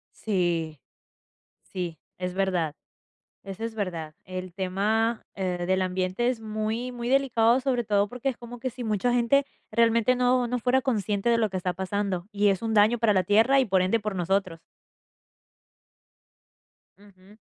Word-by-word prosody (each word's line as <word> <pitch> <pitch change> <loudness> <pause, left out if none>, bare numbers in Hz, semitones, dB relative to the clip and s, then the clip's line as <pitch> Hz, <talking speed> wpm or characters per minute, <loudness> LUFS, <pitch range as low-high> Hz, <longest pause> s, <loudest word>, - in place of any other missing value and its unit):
Sí, 170 -7 -1 0.8
sí, 175 -4 -5 0.2
es 180 0 -3
verdad, 180 -6 0 0.7
eso 195 +2 -7
es 230 -1 -4
verdad. 165 -7 -4
El 185 -1 -7
tema, 210 +5 0
eh, 180 -2 -2
del 190 0 +2
ambiente 185 +5 0
es 250 - -2
muy 220 +3 -3
muy 240 0 -4
delicado, 255 -3 +3
sobre 255 -2 0
todo 205 -1 +2
porque 250 +5 -3
es 250 - -5
como 240 0 -10
que 255 - -2
si 250 0 -8
mucha 220 +2 0
gente 245 +4 +3 0.3
realmente 230 +2 +3
no 250 0 +2
no 245 +1 -1
fuera 255 +3 +2
consciente 210 -3 0
de 230 - +4
lo 220 -2 +1
que 190 - -3
está 180 0 -2
pasando, 190 -1 -2
y 205 0 +2
es 195 -2 0
un 225 -1 -2
daño 215 +3 +5
para 225 -3 +3
la 185 -2 +2
tierra 225 +8 +4
y 260 - +3
por 190 -3 +2
ende, 190 +5 +2
por 210 -2 -4
nosotros. 185 -1 -1 2.4
Ujú. 200 0 -19
210 Hz, 165 wpm, -26 LUFS, 185-235 Hz, 2.4 s, daño